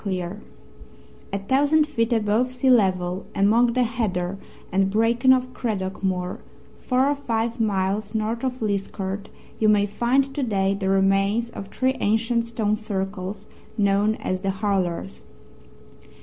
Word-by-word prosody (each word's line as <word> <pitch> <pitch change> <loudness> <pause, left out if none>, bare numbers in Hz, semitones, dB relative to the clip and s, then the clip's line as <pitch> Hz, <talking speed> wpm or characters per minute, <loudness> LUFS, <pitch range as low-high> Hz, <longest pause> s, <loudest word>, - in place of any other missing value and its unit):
CLEER 185 0 -3 0.9
A 200 - -1
thousand 285 +9 +3
feet 230 -5 -1
above 225 +2 +1
sea 255 +1 +2
level 185 -5 +2
among 230 +4 +3
the 250 0 +2
heather 195 -6 -2 0.3
and 195 +1 +2
bracken 230 +5 +3
of 255 -1 +2
Craddock 195 -7 -3
Moor, 180 -1 -1 0.4
four 255 +1 +1
or 285 - +2
five 235 -4 -2
miles 205 0 0
north 220 +2 -1
of 255 -2 -2
Liskeard, 200 -1 -3 0.3
you 215 - +4
may 205 -1 +4
find 255 +6 +1
to 290 - -2
day 195 -5 +1
the 195 -1 -2
remains 195 +4 +2
of 195 - -7
three 260 +5 0
ancient 230 +2 +1
stone 215 -2 0
circles 195 -1 -4 0.3
known 205 +1 +2
as 185 -3 -3
"The 195 - -1
Hurlers." 195 -2 -2
210 Hz, 140 wpm, -24 LUFS, 195-235 Hz, 0.9 s, you